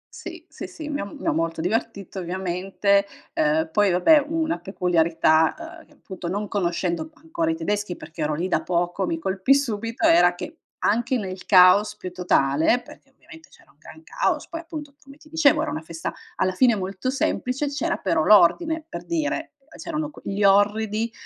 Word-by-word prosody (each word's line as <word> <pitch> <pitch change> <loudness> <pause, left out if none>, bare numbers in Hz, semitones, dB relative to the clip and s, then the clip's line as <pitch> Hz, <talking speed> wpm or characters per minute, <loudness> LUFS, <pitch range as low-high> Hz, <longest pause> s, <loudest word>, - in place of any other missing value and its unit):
Sì, - - -9
sì, - - -8
sì, 310 -2 -9
mi 290 -1 -3
ha - - -2
mi 200 - -10
ha - - +2
molto 165 0 -1
divertito, 200 0 -3
ovviamente, 190 +2 0 0.3
ehm, 160 +1 +1
poi, 205 0 +2
vabbè, 285 - +5
una 325 0 -1
peculiarità, 175 - +1
ehm, - - -24
che, - - -25
appunto, 190 -10 -9
non 200 +4 -3
conoscendo 170 -3 -1
u 160 - -14
ancora, 165 0 -2
i - - -1
tedeschi, 200 +3 -2
perché, 155 +1 -8
ero 150 0 0
lì 175 +5 -2
da - - +1
poco, 175 +2 -1
mi 165 0 -3
colpì 190 +8 +2
subito, 230 -4 0
era 175 +1 +5
che, 315 - -8 0.2
anche 240 +4 +1
nel 190 -4 -5
caos 190 +2 +6
più 185 -3 -7
totale, 170 - +2
perché, - - -16
ovviamente, 320 -2 -17
c'era - - -22
un - - -30
gran 315 - -14
caos, - - -2
poi, 330 - -5
appunto, 300 -4 -9
come 275 -1 -16
ti 305 0 -19
dicevo, 315 -1 +3
era 310 - -2
una 155 - -4
festa, 165 0 -6 0.2
alla 185 0 0
fine, 245 +1 +4
molto 195 +4 -4
semplice, 270 +1 -1
c'era 330 +4 -1
però 160 -5 0
l'ordine, 320 - +4
per - - -7
dire, 325 -1 -2 0.3
c'erano 305 -2 -4
qu - - -15
gli 200 +1 -3
orridi, 210 +3 +2
200 Hz, 185 wpm, -23 LUFS, 175-280 Hz, 0.3 s, caos